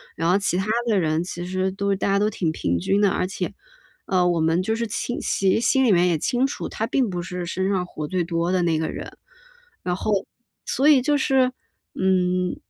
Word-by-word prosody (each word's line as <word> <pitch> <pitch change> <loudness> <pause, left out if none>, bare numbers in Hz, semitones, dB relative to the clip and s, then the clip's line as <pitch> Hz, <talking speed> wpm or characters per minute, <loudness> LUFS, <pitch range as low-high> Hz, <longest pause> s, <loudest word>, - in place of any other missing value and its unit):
然 165 +1 0
后 185 - +4
其 200 -3 0
他 190 - -1 0.2
的 210 -4 +3
人 160 -1 0
其 175 0 -6
实 185 +1 -1
都 200 +1 -1
大 190 - -2
家 200 0 +2
都 210 +1 +2
挺 170 -6 -1
平 85 - -1
均 195 - +1
的。 205 - +4
而 - - 0
且， 195 - -4 0.5
呃， 180 -2 +2
我 175 -1 +1
们 165 +2 +2
就 220 +4 -1
是 230 +1 -2
秦 220 +4 -3
其 190 -1 +1
实 - - +1
心 265 +2 +3
里 230 - +4
面 180 -1 +4
也 170 -2 +2
清 245 - +1
楚， - - -5
他 220 - -2
并 255 -4 +1
不 175 -1 -3
是 180 0 -5
身 190 +2 -1
上 190 -2 0
活 150 -3 -6
最 180 +2 -1
多 170 +1 -1
的 185 -1 +2
那 165 -2 +1
个 160 - -1
人。 - - -7 0.7
然 180 -1 -1
后 215 - -2 0.5
所 275 +4 +1
以 285 -4 +6
就 290 +3 +2
是， 265 -2 +2 0.4
嗯， 180 -1 +1
185 Hz, 245 characters per minute, -23 LUFS, 175-210 Hz, 0.7 s, 以